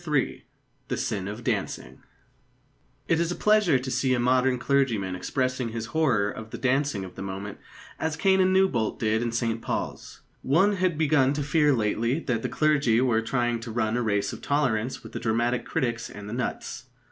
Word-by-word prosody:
III 135 Hz, -3 st, 0 dB, 0.4 s
THE -, -, -2 dB
SIN 100 Hz, -3 st, -2 dB
OF 105 Hz, +4 st, -6 dB
DANCING -, -, -3 dB, 1.1 s
It 165 Hz, -, +2 dB
is 170 Hz, 0 st, 0 dB
a -, -, -2 dB
pleasure 210 Hz, -9 st, +4 dB
to 130 Hz, +1 st, -4 dB
see 130 Hz, +1 st, +1 dB
a -, -, -1 dB
modern 125 Hz, +1 st, +3 dB
clergyman 120 Hz, -8 st, +1 dB
expressing 125 Hz, +5 st, -1 dB
his 115 Hz, 0 st, -4 dB
horror 130 Hz, -11 st, +2 dB
of 110 Hz, 0 st, -8 dB
the -, -, -6 dB
dancing 130 Hz, -6 st, 0 dB
of 90 Hz, -, -10 dB
the -, -, -9 dB
moment 95 Hz, +1 st, -6 dB, 0.4 s
as 160 Hz, -1 st, -1 dB
Canon 190 Hz, +2 st, +3 dB
Newbolt 190 Hz, -, +2 dB
did 110 Hz, 0 st, +1 dB
in 120 Hz, -1 st, -1 dB
St 115 Hz, -1 st, -1 dB
Paul's. -, -, -4 dB, 0.2 s
One 190 Hz, +9 st, +3 dB
had 185 Hz, -4 st, +1 dB
begun 145 Hz, -4 st, +3 dB
to 145 Hz, 0 st, -2 dB
fear 150 Hz, +1 st, +3 dB
lately 115 Hz, +3 st, +1 dB
that 120 Hz, -7 st, -1 dB
the -, -, -2 dB
clergy 145 Hz, -7 st, +2 dB
were 120 Hz, -3 st, +2 dB
trying 120 Hz, 0 st, 0 dB
to 115 Hz, +1 st, -8 dB
run 110 Hz, -1 st, 0 dB
a 125 Hz, -, +1 dB
race 100 Hz, -3 st, 0 dB
of -, -, -8 dB
tolerance 130 Hz, -4 st, 0 dB
with -, -, -10 dB
the -, -, -5 dB
dramatic 120 Hz, +2 st, 0 dB
critics 120 Hz, -2 st, -2 dB
and 100 Hz, 0 st, -9 dB
the 105 Hz, -, -6 dB
nuts. 125 Hz, +1 st, -4 dB
125 Hz, 190 wpm, -26 LUFS, 110-145 Hz, 1.1 s, pleasure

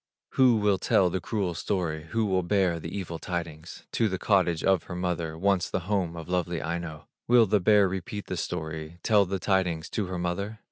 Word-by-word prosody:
Who 130 Hz, -3 st, +4 dB
will 105 Hz, -3 st, +2 dB
tell 90 Hz, 0 st, +3 dB
the 95 Hz, -, -2 dB
cruel 100 Hz, -3 st, -1 dB
story, 80 Hz, -3 st, -2 dB
Who 110 Hz, +7 st, 0 dB
will 95 Hz, -2 st, +1 dB
bear 90 Hz, -2 st, +1 dB
the 80 Hz, -, -6 dB
evil 85 Hz, -3 st, -5 dB
tidings 85 Hz, -2 st, -6 dB
To 115 Hz, -2 st, +1 dB
the 95 Hz, -, -2 dB
cottage 90 Hz, -5 st, +2 dB
of 95 Hz, -3 st, +2 dB
her 90 Hz, -, -6 dB
mother, 85 Hz, -3 st, -2 dB
Once 95 Hz, 0 st, +1 dB
the -, -, -1 dB
home 90 Hz, -2 st, -1 dB
of 80 Hz, -2 st, -7 dB
lovely 90 Hz, -2 st, -1 dB
Aino? 85 Hz, -2 st, -5 dB, 0.2 s
Will 120 Hz, -1 st, +6 dB
the 105 Hz, 0 st, +2 dB
bear 100 Hz, +1 st, +5 dB
repeat 95 Hz, +2 st, -5 dB
the -, -, -4 dB
story, 80 Hz, -1 st, -4 dB
Tell 105 Hz, -3 st, +4 dB
the 95 Hz, +1 st, -1 dB
tidings 90 Hz, -4 st, 0 dB
to 105 Hz, -4 st, -1 dB
her 90 Hz, 0 st, -4 dB
mother? 90 Hz, +5 st, -3 dB
90 Hz, 200 wpm, -27 LUFS, 85-100 Hz, 0.2 s, Will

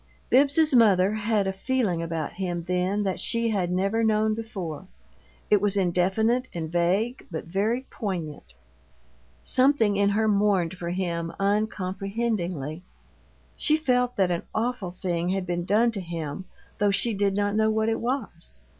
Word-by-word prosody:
Bibbs's 285 Hz, +3 st, +4 dB
mother 205 Hz, -5 st, +5 dB
had 215 Hz, -1 st, 0 dB
a 190 Hz, -, -1 dB
feeling 195 Hz, -4 st, -1 dB
about 165 Hz, -2 st, -3 dB
him 175 Hz, -2 st, -3 dB
then 180 Hz, +3 st, 0 dB
that 190 Hz, -2 st, -1 dB
she 230 Hz, 0 st, +1 dB
had 185 Hz, -5 st, 0 dB
never 195 Hz, +5 st, +1 dB
known 215 Hz, 0 st, +2 dB
before; 190 Hz, -7 st, -6 dB, 0.6 s
it 205 Hz, -2 st, +5 dB
was 205 Hz, -1 st, +1 dB
indefinite 195 Hz, +7 st, +1 dB
and 160 Hz, -2 st, -4 dB
vague, 190 Hz, +9 st, 0 dB
but 160 Hz, -3 st, -5 dB
very 205 Hz, +8 st, 0 dB
poignant 170 Hz, -, -5 dB, 0.9 s
something 255 Hz, -6 st, +3 dB
in 200 Hz, 0 st, +3 dB
her 220 Hz, +2 st, +1 dB
mourned 200 Hz, -4 st, +2 dB
for 175 Hz, -1 st, -5 dB
him 170 Hz, -2 st, -2 dB
uncomprehendingly. 195 Hz, -, -2 dB, 0.7 s
She 310 Hz, -1 st, +3 dB
felt 250 Hz, -5 st, +1 dB
that 190 Hz, -2 st, +2 dB
an 170 Hz, -, -1 dB
awful 230 Hz, -3 st, -1 dB
thing 175 Hz, -1 st, -2 dB
had 190 Hz, 0 st, -1 dB
been 175 Hz, -1 st, -2 dB
done 225 Hz, +5 st, +3 dB
to 205 Hz, -4 st, -5 dB
him, 165 Hz, -1 st, -5 dB, 0.3 s
though 205 Hz, 0 st, +3 dB
she 220 Hz, +3 st, +1 dB
did 200 Hz, -1 st, 0 dB
not 205 Hz, 0 st, 0 dB
know 220 Hz, 0 st, +3 dB
what 220 Hz, 0 st, +1 dB
it 225 Hz, -, 0 dB
was. 235 Hz, -9 st, -4 dB
200 Hz, 155 wpm, -26 LUFS, 180-220 Hz, 0.9 s, mother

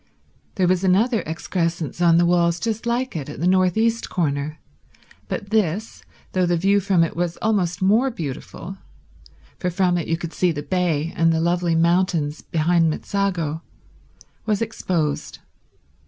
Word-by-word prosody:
There 185 Hz, -3 st, +2 dB
was 185 Hz, +1 st, +2 dB
another 215 Hz, +6 st, +3 dB
excrescence 165 Hz, 0 st, -2 dB
on 170 Hz, -1 st, +5 dB
the 175 Hz, -, +4 dB
walls 170 Hz, -1 st, +2 dB
just 225 Hz, +2 st, -3 dB
like 245 Hz, 0 st, -1 dB
it 145 Hz, -3 st, -4 dB
at 150 Hz, -, -8 dB
the 170 Hz, -, -1 dB
north 185 Hz, 0 st, +3 dB
east 230 Hz, +1 st, +1 dB
corner, 150 Hz, -2 st, -1 dB, 0.7 s
but 200 Hz, -, -5 dB
this, 215 Hz, 0 st, -1 dB, 0.3 s
though 185 Hz, -1 st, +1 dB
the 175 Hz, 0 st, +2 dB
view 195 Hz, +4 st, +3 dB
from 190 Hz, -3 st, +2 dB
it 165 Hz, -, -2 dB
was 175 Hz, 0 st, -2 dB
almost 185 Hz, -5 st, 0 dB
more 220 Hz, +8 st, +4 dB
beautiful, 170 Hz, -, -7 dB, 0.8 s
for 180 Hz, -, -1 dB
from 180 Hz, -1 st, +1 dB
it 165 Hz, -, -4 dB
you 165 Hz, -, 0 dB
could 170 Hz, -1 st, -6 dB
see 180 Hz, -1 st, +2 dB
the 145 Hz, -2 st, -5 dB
bay 165 Hz, -3 st, 0 dB
and 165 Hz, 0 st, +3 dB
the 160 Hz, -, +1 dB
lovely 170 Hz, 0 st, +1 dB
mountains 165 Hz, -3 st, +1 dB
behind 165 Hz, +1 st, +2 dB
Mezzago, 170 Hz, -3 st, -2 dB, 0.9 s
was 210 Hz, -2 st, +1 dB
exposed. 175 Hz, -9 st, -2 dB
175 Hz, 155 wpm, -22 LUFS, 165-195 Hz, 0.9 s, on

